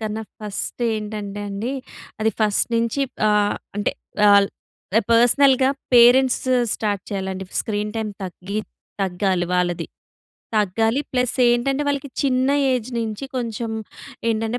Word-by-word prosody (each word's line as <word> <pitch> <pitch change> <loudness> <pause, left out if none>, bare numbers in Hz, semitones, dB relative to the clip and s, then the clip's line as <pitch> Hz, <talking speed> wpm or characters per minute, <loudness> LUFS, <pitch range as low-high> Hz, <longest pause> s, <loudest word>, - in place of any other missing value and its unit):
కన్నా 220 0 -3 0.2
ఫస్ట్ 210 +3 -4
ఏంటంటే 210 -1 -5
అండి, 210 +6 -3 0.5
అది 220 +1 +3
ఫస్ట్ 210 +1 +2
నించి 230 +4 +1 0.3
ఆహ్, 205 -1 +2 0.2
అంటే, 205 - 0 0.4
ఆల్ 200 -1 +6 0.5
ఎ - - +4
పర్సనల్‌గా 260 +3 +5 0.2
పేరెంట్స్ 245 +2 +6 0.3
స్టార్ట్ 205 -3 -2
చేయాలండి 190 -1 -3 0.2
స్క్రీన్ 210 -1 -2
టైమ్ 220 -1 -2
తగ్గి 190 +3 -5 0.4
తగ్గాలి 185 -1 0
వాళ్ళది. 175 -1 0 0.7
తగ్గాలి. 225 +5 +2
ప్లస్ 250 -1 +1
ఏంటంటే, 270 +4 +1
వాళ్ళకి 280 -1 -2
చిన్న 260 -1 +2 0.2
ఏజ్ 250 -1 -2
నించి 225 +2 -3
కొంచెం 230 -2 -3 0.6
ఏంటంటే, 225 +2 -1
220 Hz, 120 wpm, -22 LUFS, 205-245 Hz, 0.7 s, ఆల్